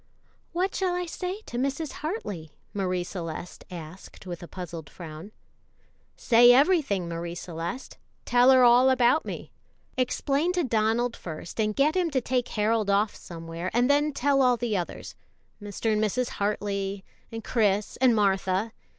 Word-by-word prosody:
"What 365 Hz, +3 st, -1 dB
shall 370 Hz, -2 st, 0 dB
I 360 Hz, 0 st, -2 dB
say 365 Hz, +4 st, -5 dB
to 240 Hz, -, -5 dB
Mrs. 275 Hz, +3 st, -2 dB
Hartley?" 210 Hz, -, -4 dB, 0.2 s
Marie 185 Hz, -3 st, -1 dB
Celeste 175 Hz, -2 st, -7 dB
asked 175 Hz, +2 st, -10 dB
with 175 Hz, -2 st, -6 dB
a 175 Hz, -, -8 dB
puzzled 170 Hz, -5 st, -8 dB
frown. 165 Hz, +3 st, -9 dB, 0.9 s
"Say 240 Hz, 0 st, +6 dB
everything, 270 Hz, -, +3 dB
Marie 170 Hz, 0 st, -5 dB
Celeste; 175 Hz, -, -6 dB, 0.3 s
tell 245 Hz, +1 st, +5 dB
her 260 Hz, -1 st, +7 dB
all 245 Hz, +2 st, +6 dB
about 260 Hz, +4 st, +3 dB
me. -, -, -7 dB, 0.5 s
Explain 280 Hz, +6 st, 0 dB
to 355 Hz, -1 st, +1 dB
Donald 230 Hz, 0 st, +1 dB
first, 165 Hz, +4 st, -8 dB
and 215 Hz, -1 st, +1 dB
get 300 Hz, +4 st, +3 dB
him 360 Hz, -2 st, +1 dB
to 275 Hz, -4 st, +1 dB
take 250 Hz, 0 st, -1 dB
Harold 215 Hz, 0 st, 0 dB
off' 205 Hz, +2 st, +2 dB
somewhere, 165 Hz, +1 st, -6 dB
and 245 Hz, +3 st, +4 dB
then 295 Hz, +1 st, +2 dB
tell 275 Hz, 0 st, +2 dB
all 250 Hz, -2 st, +4 dB
the 235 Hz, -3 st, -1 dB
others 175 Hz, -3 st, -4 dB, 0.5 s
Mr. 205 Hz, +2 st, -2 dB
and 210 Hz, 0 st, +1 dB
Mrs. 245 Hz, +4 st, 0 dB
Hartley 200 Hz, -1 st, -2 dB, 0.3 s
and 225 Hz, -1 st, -6 dB
Chris 210 Hz, -3 st, +1 dB
and 250 Hz, -2 st, +4 dB
Martha. 195 Hz, +1 st, +1 dB
225 Hz, 155 wpm, -27 LUFS, 185-260 Hz, 0.9 s, her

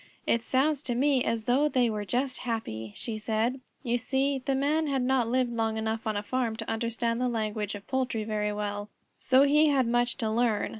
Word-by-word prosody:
"It 230 Hz, -, +2 dB
sounds 275 Hz, +4 st, +1 dB
to 245 Hz, -5 st, -3 dB
me 270 Hz, 0 st, +3 dB
as 230 Hz, -1 st, -1 dB
though 270 Hz, +6 st, +3 dB
they 255 Hz, -4 st, +2 dB
were 210 Hz, -2 st, -2 dB
just 255 Hz, +4 st, -1 dB
happy," 110 Hz, -, -4 dB
she 220 Hz, -2 st, -5 dB
said. 225 Hz, +4 st, -1 dB, 0.2 s
You 240 Hz, -1 st, 0 dB
see 270 Hz, +2 st, 0 dB
the 270 Hz, 0 st, 0 dB
Man 300 Hz, +4 st, +1 dB
had 270 Hz, -3 st, 0 dB
not 255 Hz, -2 st, +2 dB
lived 250 Hz, 0 st, +1 dB
long 225 Hz, -1 st, 0 dB
enough 220 Hz, 0 st, -2 dB
on 215 Hz, -1 st, 0 dB
a 205 Hz, -, -2 dB
farm 240 Hz, -1 st, -1 dB
to 225 Hz, 0 st, -6 dB
understand 230 Hz, +1 st, -1 dB
the 250 Hz, -, +1 dB
language 215 Hz, -3 st, -2 dB
of 205 Hz, +1 st, -9 dB
poultry 255 Hz, -4 st, -1 dB
very 210 Hz, -1 st, -1 dB
well, 205 Hz, 0 st, -4 dB, 0.3 s
so 260 Hz, +1 st, +5 dB
he 300 Hz, +2 st, +5 dB
had 275 Hz, -3 st, +3 dB
much 240 Hz, +1 st, +1 dB
to 225 Hz, -5 st, -1 dB
learn. 225 Hz, -2 st, +1 dB
235 Hz, 210 wpm, -28 LUFS, 220-265 Hz, 0.3 s, so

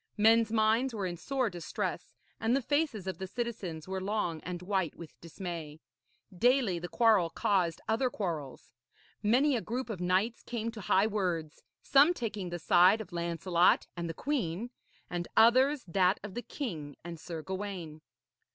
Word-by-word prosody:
Men's 225 Hz, +1 st, +5 dB
minds 225 Hz, +3 st, +2 dB
were 200 Hz, -3 st, -2 dB
in 175 Hz, -1 st, -3 dB
sore 255 Hz, +4 st, -1 dB
distress, 175 Hz, -2 st, -4 dB, 0.2 s
and 225 Hz, +3 st, +2 dB
the 275 Hz, -, +1 dB
faces 285 Hz, -, 0 dB
of 190 Hz, 0 st, -4 dB
the 190 Hz, -, -4 dB
citizens 195 Hz, -8 st, -5 dB
were 190 Hz, 0 st, -3 dB
long 190 Hz, -5 st, -1 dB
and 180 Hz, 0 st, -6 dB
white 190 Hz, -4 st, -1 dB
with 170 Hz, -2 st, -10 dB
dismay. 165 Hz, -3 st, -7 dB, 0.6 s
Daily 240 Hz, -3 st, +3 dB
the 175 Hz, -, -5 dB
quarrel 215 Hz, -8 st, +4 dB
caused 180 Hz, -2 st, 0 dB
other 240 Hz, +4 st, +1 dB
quarrels. 165 Hz, -, -5 dB, 0.5 s
Many 255 Hz, +7 st, +3 dB
a 235 Hz, -, -1 dB
group 245 Hz, +2 st, -4 dB
of 190 Hz, -5 st, -5 dB
knights 185 Hz, +6 st, +1 dB
came 230 Hz, -1 st, -4 dB
to 225 Hz, -2 st, -9 dB
high 190 Hz, +2 st, +3 dB
words, 180 Hz, -8 st, -2 dB, 0.2 s
some 290 Hz, +6 st, +5 dB
taking 210 Hz, -, -4 dB
the 175 Hz, -, -4 dB
side 180 Hz, +5 st, +5 dB
of 215 Hz, -4 st, -8 dB
Lancelot 170 Hz, +1 st, +2 dB
and 170 Hz, -1 st, -4 dB
the 165 Hz, -, -5 dB
queen, 235 Hz, -, -2 dB, 0.4 s
and 175 Hz, -1 st, -4 dB
others 255 Hz, +5 st, +5 dB
that 185 Hz, +2 st, +2 dB
of 210 Hz, -2 st, -7 dB
the 240 Hz, -, -4 dB
king 160 Hz, -, -6 dB
and 170 Hz, -1 st, -7 dB
Sir 165 Hz, -1 st, -6 dB
Gawaine. 185 Hz, -5 st, -5 dB
195 Hz, 165 wpm, -31 LUFS, 175-230 Hz, 0.6 s, Men's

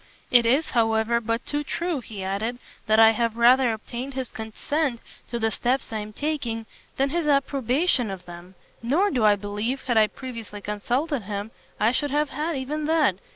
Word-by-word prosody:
"It 240 Hz, -2 st, +6 dB
is, 275 Hz, +7 st, +2 dB
however, 225 Hz, 0 st, +2 dB
but 230 Hz, +2 st, -2 dB
too 295 Hz, 0 st, -2 dB
true," 335 Hz, +1 st, -2 dB
he 210 Hz, -4 st, -8 dB
added, 205 Hz, +6 st, -2 dB, 0.3 s
"that 215 Hz, 0 st, +4 dB
I 225 Hz, 0 st, +8 dB
have 230 Hz, 0 st, -1 dB
rather 245 Hz, +1 st, +5 dB
obtained 245 Hz, +4 st, -6 dB
his 260 Hz, -2 st, -3 dB
consent 240 Hz, +4 st, -2 dB, 0.3 s
to 240 Hz, -, -3 dB
the 225 Hz, -1 st, 0 dB
steps 245 Hz, +3 st, -1 dB
I 220 Hz, -, -1 dB
am 210 Hz, 0 st, -6 dB
taking, 240 Hz, -4 st, -3 dB, 0.3 s
than 275 Hz, +1 st, +1 dB
his 335 Hz, -1 st, -1 dB
approbation 275 Hz, -, +2 dB
of 190 Hz, -2 st, -7 dB
them: 175 Hz, +2 st, -11 dB, 0.3 s
nor 310 Hz, -, +2 dB
do 245 Hz, -5 st, +1 dB
I 210 Hz, -1 st, +6 dB
believe, 210 Hz, +6 st, -3 dB
had 240 Hz, -3 st, 0 dB
I 215 Hz, -, +5 dB
previously 230 Hz, -4 st, -8 dB
consulted 245 Hz, +8 st, -1 dB
him, 205 Hz, +1 st, -4 dB, 0.3 s
I 220 Hz, -, +4 dB
should 290 Hz, +3 st, 0 dB
have 295 Hz, +1 st, 0 dB
had 310 Hz, 0 st, -2 dB
even 295 Hz, +4 st, -3 dB
that. 305 Hz, -, +3 dB
240 Hz, 185 wpm, -25 LUFS, 220-275 Hz, 0.3 s, I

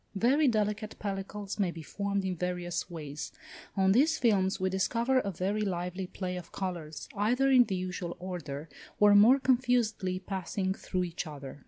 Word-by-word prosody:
Very 270 Hz, +9 st, +3 dB
delicate 215 Hz, -2 st, 0 dB
pellicles 200 Hz, 0 st, -5 dB
may 195 Hz, -3 st, +2 dB
be 165 Hz, -2 st, -7 dB
formed 200 Hz, +3 st, -2 dB
in 185 Hz, -1 st, -1 dB
various 175 Hz, 0 st, -3 dB
ways: 150 Hz, -4 st, -6 dB, 0.5 s
on 190 Hz, 0 st, +4 dB
these 295 Hz, +9 st, +4 dB
films 200 Hz, -5 st, +2 dB
we 190 Hz, -, +1 dB
discover 230 Hz, +7 st, +1 dB
a 200 Hz, -, -2 dB
very 195 Hz, +4 st, -1 dB
lively 180 Hz, -1 st, -2 dB
play 180 Hz, -1 st, -4 dB
of 180 Hz, -, -9 dB
colours, 170 Hz, -5 st, -5 dB
either 245 Hz, +7 st, +2 dB
in 250 Hz, -2 st, +7 dB
the 195 Hz, -, -2 dB
usual 180 Hz, -1 st, -4 dB
order, 165 Hz, -5 st, -5 dB, 0.3 s
or 210 Hz, 0 st, +7 dB
more 225 Hz, +7 st, +7 dB
confusedly 240 Hz, -7 st, +1 dB
passing 190 Hz, 0 st, -2 dB
through 185 Hz, -1 st, -2 dB
each 170 Hz, -1 st, -4 dB
other. 145 Hz, -2 st, -8 dB
190 Hz, 165 wpm, -30 LUFS, 180-215 Hz, 0.5 s, in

